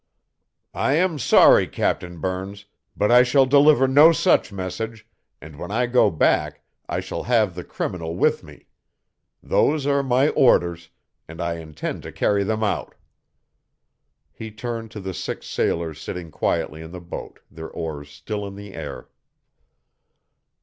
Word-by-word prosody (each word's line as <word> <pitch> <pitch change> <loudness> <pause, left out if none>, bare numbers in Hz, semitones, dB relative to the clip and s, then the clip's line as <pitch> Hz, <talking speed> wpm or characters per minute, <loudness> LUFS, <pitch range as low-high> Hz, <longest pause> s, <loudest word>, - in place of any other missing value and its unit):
"I 135 - 0
am 165 -1 +1
sorry, - - +6
Captain 90 -1 -2
Burns, 95 +3 -5 0.3
but 105 +3 +2
I 125 +1 +8
shall 130 +2 +4
deliver 140 0 +5
no 145 +5 +7
such 165 - +2
message, 105 +4 -5 0.3
and 75 +1 -12
when 90 - -6
I 120 +4 0
go 120 +1 +3
back 80 - 0 0.3
I - - -1
shall - - -5
have 110 -6 +2
the 90 +1 -7
criminal 85 -2 -5
with - - +1
me. - - -15 0.8
Those 150 -2 +1
are 140 0 +2
my 135 +2 +2
orders, 85 -8 +2 0.4
and 80 +1 -11
I 85 -1 -2
intend 80 -2 -6
to - - -9
carry 100 -1 +1
them 110 +2 -1
out." 105 - -2 1.4
He 110 - -8
turned 115 +1 -6
to 110 - -9
the 95 -1 -5
six - - -5
sailors 80 -2 -2
sitting 85 -3 -7
quietly 80 +1 -2
in 80 - -9
the 90 - -7
boat, 85 -1 -9
their 80 0 -9
oars 75 -3 -6
still 100 +9 -6
in 100 - -9
the 100 -1 -10
air. - - -7
100 Hz, 150 wpm, -22 LUFS, 85-125 Hz, 1.4 s, I